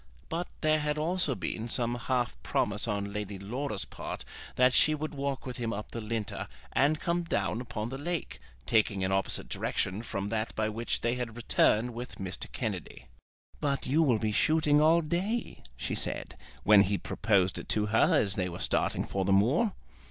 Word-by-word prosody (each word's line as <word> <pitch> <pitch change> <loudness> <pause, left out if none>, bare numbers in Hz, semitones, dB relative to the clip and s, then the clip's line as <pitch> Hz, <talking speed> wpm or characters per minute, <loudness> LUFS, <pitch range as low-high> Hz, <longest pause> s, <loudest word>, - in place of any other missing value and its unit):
But 170 +2 -2
there 155 -1 +3
had 150 0 -1
also 160 -3 +1
been 110 +5 -3
some 120 0 +1
half 120 0 -1
promise 105 +2 +1
on 100 -2 -2
Lady 105 -1 -4
Laura's 105 +2 -3
part - - -6 0.3
that 125 0 +5
she 155 +4 +5
would 155 +1 -4
walk 140 -1 -3
with 125 -2 -5
him 115 -2 -2
up 105 0 -5
the 115 - -4
Linter 110 -1 -3 0.3
and 150 +3 +3
come 170 0 0
down 115 - -1
upon 115 -2 -4
the 135 +1 -5
lake, 170 +2 -3 0.3
taking 105 -1 +2
an 95 - 0
opposite 95 0 +1
direction 95 +3 -1
from 100 -3 -4
that 110 0 -2
by 110 0 0
which 115 +2 -2
they 120 0 +1
had 120 -3 -4
returned 120 0 +2
with 120 +2 -6
Mr. 95 -2 -5
Kennedy. - - -5 0.5
"But 140 -2 -1
you 145 +5 +3
will 130 -8 +4
be 110 0 -1
shooting 150 +5 +3
all 165 +2 +5
day," 185 +9 -2 0.2
she - - -3
said, - - -3 0.3
when 105 -1 +7
he 100 +1 +1
proposed 95 -5 +1
it - - -10
to 105 -1 +1
her 110 +1 +4
as 100 -2 +2
they 90 -2 -1
were 85 - -6
starting - - 0
for 95 - -1
the 95 - +1
moor. 130 - +3
115 Hz, 190 wpm, -30 LUFS, 105-145 Hz, 0.5 s, when